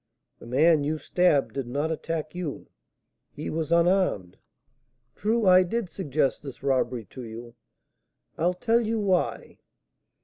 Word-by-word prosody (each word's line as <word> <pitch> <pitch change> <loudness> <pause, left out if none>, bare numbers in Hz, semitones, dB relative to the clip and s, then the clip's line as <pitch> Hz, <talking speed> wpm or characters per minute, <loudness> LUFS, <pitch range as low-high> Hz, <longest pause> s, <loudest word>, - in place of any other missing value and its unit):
"The - - -12
man 150 +5 +4
you 155 +2 -1
stabbed 155 -3 +2
did 135 -3 -4
not 145 +6 -1
attack 155 -1 -4
you, 175 -5 -6 0.6
he 150 - -6
was 160 0 -3
unarmed. 170 - +2 0.8
True, 225 +1 0
I 185 0 +7
did 190 +2 -2
suggest 150 -7 -1
this 135 -2 -10
robbery 130 -4 0
to 130 - -8
you, 115 0 -9 0.8
I'll 175 +3 0
tell 230 +5 +2
you 225 0 -1
why. 190 -4 -1
160 Hz, 135 wpm, -26 LUFS, 135-180 Hz, 0.8 s, I